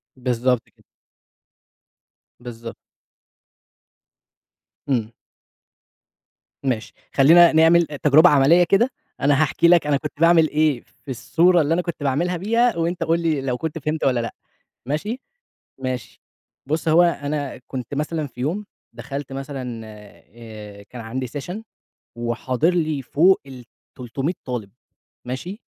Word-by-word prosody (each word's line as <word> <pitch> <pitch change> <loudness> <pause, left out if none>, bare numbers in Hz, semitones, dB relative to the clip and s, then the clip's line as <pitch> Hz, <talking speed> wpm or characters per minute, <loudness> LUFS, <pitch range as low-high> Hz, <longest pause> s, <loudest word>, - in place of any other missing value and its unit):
بالضبط 125 -1 -1
كده. - - -29 1.6
بالضبط. 115 -1 -8 2.1
امم. 120 -5 0 1.5
ماشي، 125 -5 -2 0.2
خلّينا 165 +5 +7
نعمل 165 +2 +5
تجربة 150 +3 +5
عملية 150 +5 +5
كده، 195 +8 +3 0.3
أنا 140 +1 +3
هاحكي 155 +2 +2
لك 170 -3 +5
أنا 145 - +2
كنت 150 +1 -6
باعمل 165 -1 +5
إيه 150 -5 +1 0.2
في 135 - -6
الصورة 170 +7 +3
اللي 150 +2 +1
أنا 180 - +1
كنت 170 -4 -6
باعملْها 170 +6 0
بيها 230 +3 +1
وأنت 170 +1 -1
قُل 165 +1 +1
لي 160 -4 0
لو 130 -2 -2
كنت 160 +3 -4
فهِمت 155 +1 -3
والّا 125 -3 +2
لأ، 115 - -4 0.5
ماشي؟ 190 - -3 0.6
ماشي. 130 -2 -5 0.4
بُص 155 +4 -2
هو 160 +2 +6
أنا 145 -4 -2
كنت 130 -1 -6
مثلًا 150 +1 -2
في 125 -2 -10
يوم 180 +10 -2 0.3
دخَلت 135 +3 -7
مثلًا 135 -4 -6
آآ 105 0 -12
كان 120 +4 -10
عندي 125 +3 -4
سيشن 175 - -6 0.5
وحاضر 120 +5 0
لي 155 -5 0
فوق 170 +9 +3
ال300 130 +2 -7
طالِب، 120 -6 -5 0.5
ماشي؟ 175 - -6
145 Hz, 125 wpm, -22 LUFS, 125-165 Hz, 2.1 s, خلّينا